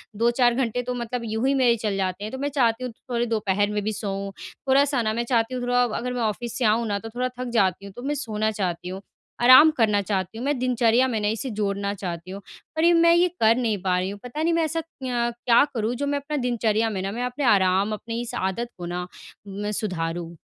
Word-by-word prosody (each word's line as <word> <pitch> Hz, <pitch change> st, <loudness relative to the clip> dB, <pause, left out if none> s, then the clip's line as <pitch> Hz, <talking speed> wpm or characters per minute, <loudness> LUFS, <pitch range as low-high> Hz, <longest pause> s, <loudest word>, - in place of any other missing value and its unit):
2-4 240 Hz, +2 st, +3 dB
घंटे 245 Hz, -1 st, 0 dB
तो 250 Hz, +1 st, -3 dB
मतलब 245 Hz, 0 st, -4 dB
यूँ 220 Hz, +3 st, -1 dB
ही 275 Hz, -, +3 dB
मेरे 250 Hz, -3 st, +4 dB
चले 210 Hz, -3 st, -2 dB
जाते 190 Hz, +1 st, -2 dB
हैं 215 Hz, -, -5 dB
तो -, -, -4 dB
मैं 285 Hz, +2 st, -2 dB
चाहती 255 Hz, -4 st, +1 dB
हूँ 250 Hz, -, -4 dB
थोड़े 240 Hz, +1 st, -3 dB
दोपहर 205 Hz, -3 st, 0 dB
में 210 Hz, -1 st, -2 dB
भी 215 Hz, +1 st, -1 dB
सोऊँ 195 Hz, -1 st, -4 dB, 0.4 s
थोड़ा-सा 275 Hz, -1 st, +3 dB
ना 215 Hz, -1 st, 0 dB
मैं 235 Hz, +2 st, -1 dB
चाहती 235 Hz, 0 st, +1 dB
हूँ 250 Hz, -, -3 dB
थोड़ा 245 Hz, 0 st, +2 dB
अगर 245 Hz, +1 st, -2 dB
मैं 245 Hz, -, -2 dB
ऑफ़िस 225 Hz, +1 st, -2 dB
से 250 Hz, -, 0 dB
आऊँ 225 Hz, +2 st, +2 dB
ना 205 Hz, -1 st, -1 dB
तो 225 Hz, -, -8 dB
थोड़ा 250 Hz, +1 st, 0 dB
थक 255 Hz, -1 st, -3 dB
जाती 195 Hz, -3 st, +1 dB
हूँ 200 Hz, -, -10 dB
तो 245 Hz, -, -7 dB
मैं 290 Hz, +2 st, -1 dB
सोना 220 Hz, -6 st, -1 dB
चाहती 180 Hz, -4 st, -3 dB
हूँ। 190 Hz, +1 st, -6 dB, 0.4 s
आराम 260 Hz, +6 st, +9 dB
करना 210 Hz, -4 st, +3 dB
चाहती 195 Hz, 0 st, -3 dB
हूँ। 240 Hz, -, -4 dB
मैं 290 Hz, 0 st, +1 dB
दिनचर्या 250 Hz, 0 st, +3 dB
में 230 Hz, -4 st, -1 dB
ना 210 Hz, -, 0 dB
इसे 225 Hz, +5 st, -2 dB
जोड़ना 200 Hz, -1 st, -1 dB
चाहती 180 Hz, -2 st, -6 dB
हूँ। 200 Hz, +1 st, -7 dB, 0.3 s
पर 315 Hz, -, 0 dB
ये 345 Hz, -, +6 dB
मैं 335 Hz, 0 st, +5 dB
ये 350 Hz, +1 st, +4 dB
कर 225 Hz, +1 st, +5 dB
नहीं 230 Hz, -4 st, 0 dB
पा 185 Hz, -1 st, +1 dB
रही 185 Hz, +1 st, -2 dB
हूँ 200 Hz, -, -9 dB
पता 250 Hz, +6 st, -4 dB
नहीं 335 Hz, +1 st, +2 dB
मैं 330 Hz, 0 st, +2 dB
ऐसा 325 Hz, +1 st, -2 dB
क्यं 250 Hz, -7 st, -3 dB
क्या 235 Hz, +1 st, +6 dB
करूँ 225 Hz, -1 st, -1 dB
जो 285 Hz, +3 st, -2 dB
मैं 285 Hz, 0 st, 0 dB
अपना 295 Hz, +2 st, -4 dB
दिनचर्या 230 Hz, -3 st, +1 dB
में 195 Hz, -3 st, -3 dB
ना 195 Hz, +1 st, -3 dB
मैं 240 Hz, +4 st, -3 dB
अपने 250 Hz, +3 st, -3 dB
आराम 195 Hz, -1 st, +3 dB
अपने 230 Hz, +2 st, -5 dB
इस 240 Hz, -, -6 dB
आदत 190 Hz, +6 st, -2 dB
को 175 Hz, -, -6 dB
ना 180 Hz, +1 st, -4 dB, 0.4 s
मैं 205 Hz, +1 st, -4 dB
सुधारूँ। 170 Hz, -4 st, -3 dB
230 Hz, 250 wpm, -24 LUFS, 200-250 Hz, 0.4 s, आराम